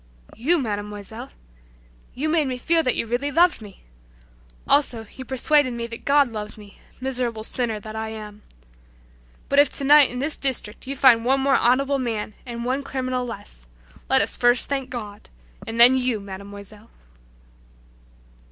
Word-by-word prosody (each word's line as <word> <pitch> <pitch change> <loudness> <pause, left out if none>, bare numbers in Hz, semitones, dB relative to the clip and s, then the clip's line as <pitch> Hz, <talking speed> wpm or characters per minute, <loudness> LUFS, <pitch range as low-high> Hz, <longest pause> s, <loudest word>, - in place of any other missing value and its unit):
"You, 315 +10 +1
Mademoiselle! 210 - -5 0.9
You 290 +5 -2
made 310 -2 +1
me 255 -1 -3
feel 330 +6 +1
that 255 -5 0
you - - -2
really 245 +5 -2
loved 340 -2 +3
me. 205 -3 -13 0.8
Also, 245 -6 +3
you 260 - -8
persuaded 265 +1 +1
me 235 0 -4
that 230 0 -9
God 280 -2 +4
loved 210 -1 -7
me, 205 -2 -15 0.2
miserable 250 -4 -3
sinner 225 -2 -1
that 215 +1 -9
I 220 0 -4
am. 210 -1 -9 1.1
But 280 - +3
if 285 -2 +5
tonight 285 0 +5
in 250 - -6
this 290 +4 -1
district 255 -4 -1
you 275 - -4
find 255 -4 +5
one 265 +2 +2
more 275 0 +2
honorable 275 +3 +2
man 225 -4 -3
and 235 -1 -6
one 260 +3 -1
criminal 255 -2 -3
less, 200 - -10 0.4
let 265 0 +4
us - - -4
first 245 0 +3
thank 270 -2 -3
God, 210 -5 -8 0.4
and 225 +1 -5
then 245 +2 +9
you, 250 -4 0
Mademoiselle!" 200 +2 -11
245 Hz, 160 wpm, -23 LUFS, 220-270 Hz, 1.1 s, then